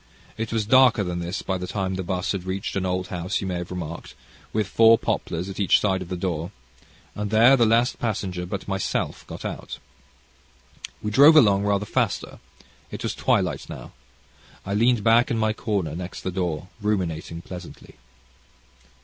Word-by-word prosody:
It 115 0 -4
was 110 -2 0
darker 125 -2 +5
than 90 -2 -3
this 85 +2 -4
by 95 -1 -2
the 90 - -5
time 95 -1 -2
the 95 - -3
'bus 90 +1 -2
had 100 -3 -3
reached 95 +1 -3
an 95 -1 -1
old 90 0 -2
house, 90 +3 -2
you - - -4
may 90 -2 -2
have 90 0 -6
remarked, 85 -2 -7 0.4
with 110 -1 0
four 115 +4 +5
poplars 85 -3 -2
at 95 - -7
each 100 - +4
side 95 -2 0
of 90 - -7
the 90 - -3
door, 85 -2 -3 0.6
and 105 0 -4
there 115 +5 +6
the 120 -4 +3
last 115 +3 +2
passenger 95 -6 -3
but 95 +1 -5
myself 95 -1 -2
got - - -8
out. - - -6 1.3
We 105 - -2
drove 145 +7 +7
along 100 -8 +5
rather 100 0 +1
faster. - - -2 0.5
It - - -7
was - - -1
twilight - - 0
now. - - -9 0.7
I 100 - -3
leaned 115 +1 +3
back 115 +2 +4
in 115 - 0
my 110 -1 +1
corner 100 -8 -2
next 90 +1 -6
the 95 - -3
door 90 -2 -3
ruminating 85 -5 -2
pleasantly. 90 -1 -10
95 Hz, 180 wpm, -24 LUFS, 90-110 Hz, 1.3 s, drove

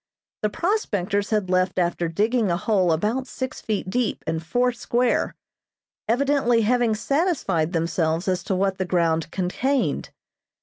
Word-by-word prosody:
The 210 - +1
prospectors 205 - -1
had 210 -4 0
left 185 0 +1
after 175 -1 0
digging 215 +6 +1
a 170 - +1
hole 190 -3 +2
about 215 +11 0
six 260 0 -5
feet 210 -4 -2
deep 235 +3 -1
and 160 0 -2
four 245 +9 +1
square, 240 +1 0 0.7
evidently 245 -1 +2
having 235 0 +2
satisfied 245 - 0
themselves 165 0 0
as 180 -2 0
to 190 - 0
what 190 0 0
the 185 - 0
ground 165 -3 +1
contained. 240 +11 -1
205 Hz, 140 wpm, -24 LUFS, 175-245 Hz, 0.7 s, hole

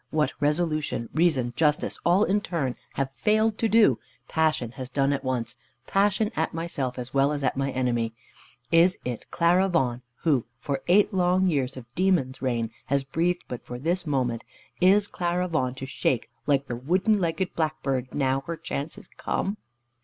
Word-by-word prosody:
What 155 -1 +1
resolution, 150 -4 0
reason, 145 -8 +2
justice, 150 +1 +1
all 180 +4 +4
in 205 0 +2
turn, 150 -10 -2 0.2
have 135 -1 -2
failed 215 0 +2
to 225 - +2
do, 210 - +5 0.3
passion 155 -7 +1
has 130 +1 -7
done 135 +2 +1
at 140 - -3
once 125 -3 -2 0.3
passion 205 - +2
at 160 0 -1
myself, 145 -7 -3
as 125 0 -6
well 140 +1 +3
as 145 -2 -3
at 130 - +1
my 135 0 0
enemy. 120 -3 -1 0.6
Is 170 +2 +5
it 125 -2 -5
Clara 180 +3 +3
Vaughan, 125 -8 +1 0.2
who, 140 -9 +2
for 135 +2 -3
eight 205 +4 +4
long 185 0 +3
years 140 -6 0
of 125 - -8
demon's 170 -8 +1
reign, 120 -4 -1 0.2
has 140 0 +1
breathed 170 +6 0
but 125 - -6
for 125 - -7
this 170 +6 -1
moment 125 -5 0 0.4
is 200 +3 +5
Clara 180 0 -1
Vaughan 130 -7 -1
to 135 - -6
shake 130 -2 -1 0.2
like 140 -1 +2
the 120 - -4
wooden 185 - +2
legged 175 +2 -1
blackbird 135 -5 -1
now 135 -1 +1
her 170 0 -3
chance 145 +1 -4
is - - -12
come? 200 +2 -3
150 Hz, 175 wpm, -26 LUFS, 130-175 Hz, 0.6 s, do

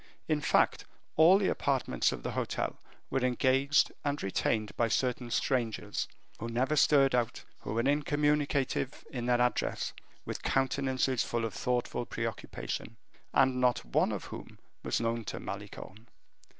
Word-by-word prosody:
In 155 -2 +1
fact, - - +2 0.3
all 165 +5 +7
the 200 - +1
apartments 135 -2 +1
of - - -6
the - - -2
hotel - - -2 0.3
were 135 - +2
engaged 130 +3 +3
and 145 0 -1
retained 105 +2 0
by 115 - +2
certain 125 +1 0
strangers, 120 -2 -1 0.3
who 115 - -4
never 130 +6 +1
stirred 140 -2 +5
out, 120 -2 0 0.2
who 105 - -5
were 115 - +1
incommunicative 145 -2 +1
in 125 -4 -3
their 120 0 +3
address, 125 0 0 0.3
with - - -5
countenances 130 -1 +1
full 115 -1 -1
of 110 - -4
thoughtful 120 +1 -1
preoccupation, 115 0 -4 0.3
and 130 -1 +3
not 125 - +2
one - - +2
of - - -3
whom - - -9 0.2
was - - 0
known 115 0 -1
to - - -4
Malicorne. 105 +2 -8
125 Hz, 145 wpm, -31 LUFS, 115-140 Hz, 0.3 s, all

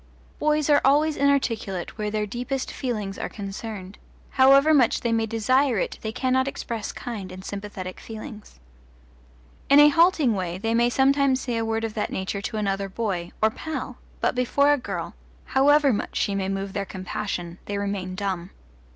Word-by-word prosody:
Boys 300 -1 +2
are 290 -1 +5
always 295 +3 +3
inarticulate 230 -10 0
where 210 -1 -2
their 210 0 -1
deepest 250 +5 -3
feelings 210 -6 -4
are - - -3
concerned; 200 -1 -7 0.3
however 275 +3 +6
much 255 -6 +3
they 235 - 0
may 225 -1 +1
desire 245 +3 +2
it - - -2
they 220 - -3
cannot 260 +2 +1
express 230 -5 -4
kind 205 -6 -6
and 185 +1 -10
sympathetic 200 -2 -6
feelings. 220 - -10 1.1
In 280 - +8
a 295 0 +9
halting 330 -5 +4
way 180 -3 -3
they 225 +4 -1
may 235 +1 +3
sometimes 270 +1 +3
say 245 -2 -2
a 225 - 0
word 225 0 -1
of 225 -1 -3
that 210 - -2
nature 190 +1 -3
to 220 +2 -4
another 195 -1 -1
boy, 190 -4 -3
or 220 - +5
pal, 270 -2 -6 0.2
but - - +2
before 280 +4 +3
a - - +2
girl, - - -5 0.3
however 280 0 +4
much 205 - -3
she 200 - 0
may 195 -1 -1
move 195 0 -3
their 200 - -1
compassion, 185 -2 -5
they 205 - -3
remain 200 -2 -3
dumb. 185 -2 -3
225 Hz, 175 wpm, -25 LUFS, 195-265 Hz, 1.1 s, a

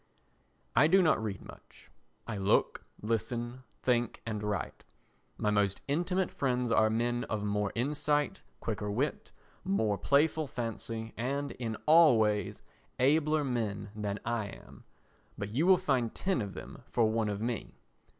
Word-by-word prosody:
I 150 - +6
do 190 +3 +5
not 155 -9 +3
read 105 -3 -4
much; - - -15 0.3
I 115 - -4
look, 100 0 +1 0.2
listen, 120 +3 -2 0.2
think 120 -1 +1
and 110 -2 -3
write. 105 -1 -3 0.5
My 105 - +1
most 100 -2 +1
intimate 175 +5 0
friends 125 -3 0
are 110 -1 +4
men 120 +2 0
of 105 -2 -3
more 105 -1 0
insight, 145 +3 0 0.2
quicker 105 - -3
wit, 130 +9 -2 0.3
more 110 - +1
playful 150 - +2
fancy 115 -2 -4
and, 140 +4 -2
in 115 -3 -4
all 155 -5 +7
ways, 105 -2 0 0.4
abler 150 +3 +3
men 110 -6 -2
than 105 -1 -3
I 115 -3 -1
am, - - -13 0.5
but 100 - -4
you 145 +10 +1
will 190 -1 +7
find 130 -10 0
ten 190 -7 0
of 100 -2 -5
them - - -9
for 120 - +2
one 110 0 +1
of 100 -1 -3
me. 115 0 -3
120 Hz, 150 wpm, -31 LUFS, 105-145 Hz, 0.5 s, all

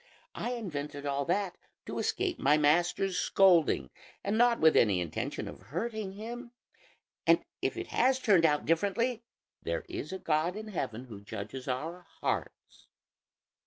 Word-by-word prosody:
I 245 - -3
invented 150 -10 -5
all 140 0 0
that 185 +2 -1 0.3
to - - -4
escape - - -1
my 145 +2 +4
master's 175 +5 +2
scolding, 170 - +4 0.3
and 200 +2 0
not 240 +1 +4
with 160 0 +5
any 100 -5 +4
intention 85 -3 -3
of - - -9
hurting 215 - -3
him; 235 +4 -7 0.7
and - - +5 0.2
if - - -1
it - - -5
has 260 0 +3
turned 205 -9 +4
out 150 -2 +3
differently, 205 +8 +1 0.4
there - - -3
is 360 - -5
a 190 - -3
God 165 +1 0
in 215 0 -6
heaven 125 - -4
who 105 -5 -10
judges 105 +6 -7
our 165 +8 -4
hearts." - - -4
175 Hz, 150 wpm, -31 LUFS, 145-215 Hz, 0.7 s, with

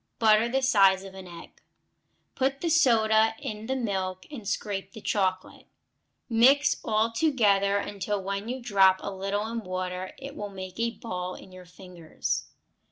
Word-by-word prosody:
Butter 220 +1 +4
the 265 +2 0
size 195 -7 +4
of 195 -1 -10
an 190 -1 -10
egg. 170 -1 -13 0.7
Put 270 +1 -1
the 335 - 0
soda 225 -7 +4
in 215 0 -6
the 265 - -1
milk 190 -6 -3
and 230 -9 -8
scrape 195 -1 -3
the - - -9
chocolate. 185 -3 -2 0.6
Mix 265 +5 +4
all 220 +1 +1
together 210 -7 +2
until 200 0 -3
when 200 +3 -4
you 255 +1 -3
drop 195 -4 +4
a 200 - -4
little 195 +2 -2
in 230 +1 -3
water 185 -2 -5
it 275 +1 -9
will 205 - -5
make 190 0 -9
a 230 0 +1
ball 185 -6 -5
in 190 - -13
your 185 0 -12
fingers. 180 -2 -5
205 Hz, 165 wpm, -27 LUFS, 190-230 Hz, 0.7 s, Butter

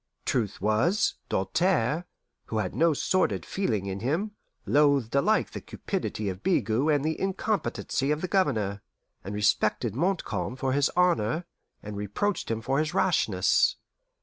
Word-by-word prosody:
Truth 110 -5 -1
was, 110 - +2 0.2
Doltaire, 160 - +1 0.4
who 110 - -4
had 95 -4 -1
no 165 +1 +3
sordid 185 +5 0
feeling 110 - -1
in 95 0 -4
him, 160 - -1 0.3
loathed 140 -5 +3
alike 140 0 +2
the - - -6
cupidity 105 - -4
of 95 0 -4
Bigot 125 - +1
and 145 -1 +2
the 160 0 -1
incompetency 195 -7 -1
of 150 +1 0
the 185 - -1
Governor, 110 - 0 0.4
and 100 +2 -5
respected 105 +1 +1
Montcalm 125 - -1
for 130 0 -1
his 140 0 +3
honour, 165 -3 +2 0.4
and 105 0 -6
reproached 105 - -2
him 115 -1 -1
for 135 +5 0
his 155 -1 -1
rashness. 110 - +3
135 Hz, 145 wpm, -27 LUFS, 105-170 Hz, 0.4 s, no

